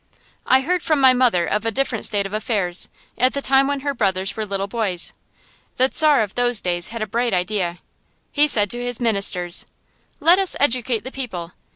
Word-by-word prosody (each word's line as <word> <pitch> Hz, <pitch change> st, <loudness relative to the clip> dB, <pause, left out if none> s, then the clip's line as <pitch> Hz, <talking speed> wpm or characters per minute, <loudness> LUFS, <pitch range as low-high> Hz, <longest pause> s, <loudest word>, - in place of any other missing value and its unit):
I 260 Hz, +1 st, +4 dB
heard 360 Hz, +5 st, -1 dB
from 310 Hz, -3 st, 0 dB
my 260 Hz, -1 st, +6 dB
mother 245 Hz, -9 st, +2 dB
of 210 Hz, -, -1 dB
a 225 Hz, -, 0 dB
different 225 Hz, -1 st, -1 dB
state 205 Hz, -2 st, 0 dB
of 195 Hz, -, -7 dB
affairs, 200 Hz, -5 st, 0 dB, 0.3 s
at 255 Hz, +1 st, +2 dB
the -, -, 0 dB
time 270 Hz, +1 st, +3 dB
when 280 Hz, -1 st, -2 dB
her 285 Hz, 0 st, -2 dB
brothers 195 Hz, -5 st, -1 dB
were 215 Hz, -1 st, -4 dB
little 195 Hz, 0 st, -2 dB
boys. 200 Hz, -4 st, -1 dB, 0.6 s
The 260 Hz, +1 st, +2 dB
Czar 300 Hz, -6 st, +4 dB
of 205 Hz, -, -7 dB
those 245 Hz, -2 st, +2 dB
days 175 Hz, -1 st, -2 dB
had 230 Hz, -1 st, -5 dB
a -, -, -2 dB
bright 235 Hz, 0 st, -1 dB
idea. 180 Hz, -1 st, -2 dB, 0.5 s
He 295 Hz, 0 st, +3 dB
said 205 Hz, -8 st, +4 dB
to 240 Hz, 0 st, -4 dB
his 245 Hz, -1 st, -3 dB
ministers: 200 Hz, -6 st, 0 dB, 0.5 s
"Let 350 Hz, +3 st, +5 dB
us 385 Hz, -2 st, +2 dB
educate 250 Hz, -5 st, 0 dB
the 260 Hz, -, -8 dB
people. 185 Hz, -11 st, -6 dB
230 Hz, 200 wpm, -20 LUFS, 195-260 Hz, 0.6 s, my